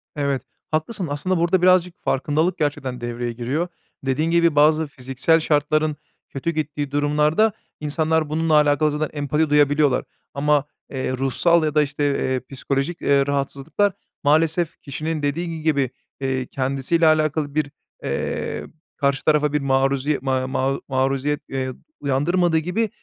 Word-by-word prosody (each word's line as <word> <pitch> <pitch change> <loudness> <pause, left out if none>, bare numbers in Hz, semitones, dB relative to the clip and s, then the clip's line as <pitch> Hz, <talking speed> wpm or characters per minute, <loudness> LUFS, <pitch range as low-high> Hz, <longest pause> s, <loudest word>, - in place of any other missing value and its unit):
Evet, 140 -3 0 0.3
haklısın. 165 +4 -1
Aslında 165 +6 -1
burada 175 +2 +2
birazcık 180 -1 +4
farkındalık 155 +6 0
gerçekten 135 -4 -2
devreye 120 0 -3
giriyor. 130 +9 -2 0.4
Dediğin 155 +5 0
gibi 170 -2 +3
bazı 155 +1 +4
fiziksel 135 +3 +1
şartların 155 0 +1 0.3
kötü 140 +5 -2
gittiği 150 -2 -3
durumlarda, 150 +8 +2 0.3
insanlar 155 +1 0
bununla 160 +1 0
alakalı 150 0 +4
zaten 150 +1 -2
empati 150 +2 +1
duyabiliyorlar 145 -2 +3 0.3
ama, 145 0 +2 0.2
eee, 130 -1 -3
ruhsal 160 +6 +3
ya 155 -1 -1
da, 150 - +6
işte, 145 0 -2 0.3
eee, 130 - 0
psikolojik, 140 +4 -2
eee, 140 -1 +3
rahatsızlıklar 140 +7 0 0.3
maalesef 160 +3 +2
kişinin 155 +2 -4
dediği 165 +2 -2
gibi, 140 -5 +1 0.3
iii, 130 -1 -1
kendisiyle 135 +5 +1
alakalı 155 -1 +1
bir, 145 -2 0 0.3
eee, - - -3 0.3
karşı 140 -1 0
tarafa 150 -1 +3
bir 150 - +1
maruziye 135 +1 +1
ma 130 -1 0
ma 135 +1 0
maruziyet, 135 +2 0
eee, 130 -1 -2 0.3
uyandırmadığı 160 +5 +1
gibi 180 +8 0
150 Hz, 135 wpm, -22 LUFS, 135-160 Hz, 0.4 s, da